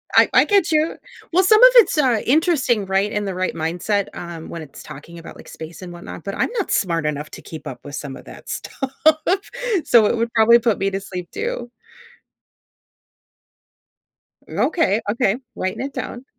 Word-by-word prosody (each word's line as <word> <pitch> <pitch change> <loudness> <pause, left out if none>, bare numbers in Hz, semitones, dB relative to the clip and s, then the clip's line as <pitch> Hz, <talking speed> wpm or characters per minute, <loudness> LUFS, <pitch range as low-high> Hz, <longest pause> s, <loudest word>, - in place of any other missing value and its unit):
I - - +6
I - - +7
get 395 -5 +2
you. 310 +1 +1 0.4
Well, 370 +3 +4
some 430 +4 +5
of - - +11
it's, 455 -8 +6
uh, 250 -7 +2
interesting, 270 - +2
right? 195 +2 0
In 210 0 -2
the 195 - -3
right 185 0 -1
mindset, 180 +5 -1
um, 170 -2 -8
when 170 - -6
it's 150 -3 -12
talking 155 +3 -11
about, 165 - -11
like, - - -14
space 160 +3 -10
and 175 -1 -8
whatnot, 175 -1 -9
but 195 - -5
I'm - - 0
not 390 - -3
smart 165 -4 0
enough 150 0 -3
to - - -10
keep 160 - -9
up 125 -2 -7
with 145 0 -7
some 140 -2 -6
of - - -14
that - - -12
stuff. 270 -2 -5 0.9
So, 230 -3 +5
it 240 - 0
would 230 +1 -1
probably 235 +1 +6
put 225 -3 0
me 195 - +1
to 195 - -2
sleep 180 -2 -7
too. 440 - -4 2.8
Okay, 230 - +1
okay, 215 -2 +1 0.2
writing 185 - -3
it 275 - -7
down. 245 +2 -6
205 Hz, 185 wpm, -21 LUFS, 170-265 Hz, 2.8 s, of